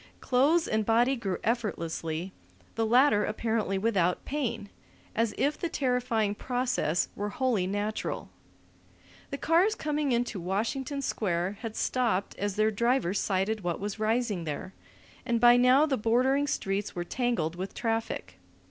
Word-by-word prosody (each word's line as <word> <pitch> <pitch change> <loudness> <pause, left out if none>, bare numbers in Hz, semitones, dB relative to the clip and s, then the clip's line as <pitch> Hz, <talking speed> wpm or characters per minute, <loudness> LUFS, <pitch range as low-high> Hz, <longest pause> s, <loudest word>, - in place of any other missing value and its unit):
Clothes 295 +7 +3
and 215 0 +1
body 235 +5 +3
grew 200 -7 -3
effortlessly, 170 -6 -2 0.4
the 225 -1 0
latter 240 -2 +5
apparently 215 -3 -1
without 190 -4 +1
pain, 235 -8 -3 0.5
as 230 -1 +1
if 295 +2 0
the 340 - -2
terrifying 250 -7 0
process 245 -8 0
were 205 +1 -3
wholly 225 -5 0
natural. 205 +2 -3 1.0
The 280 - -4
cars 350 +9 +3
coming 300 -2 -1
into 240 -4 0
Washington 240 - -2
Square 190 -3 -1
had 225 -2 -5
stopped 230 -6 0
as 205 -1 -1
their 215 +1 +2
drivers 235 -3 +1
sighted 200 +3 0
what 175 -2 -2
was 205 +1 -4
rising 215 -5 0
there, 155 +5 -5 0.5
and 235 -2 0
by 240 +1 +7
now 250 +4 +5
the 275 -4 0
bordering 255 +6 +2
streets 195 -5 -2
were 175 - -2
tangled 230 -8 -1
with 185 +2 -6
traffic. 225 - -3
225 Hz, 140 wpm, -28 LUFS, 195-250 Hz, 1.0 s, by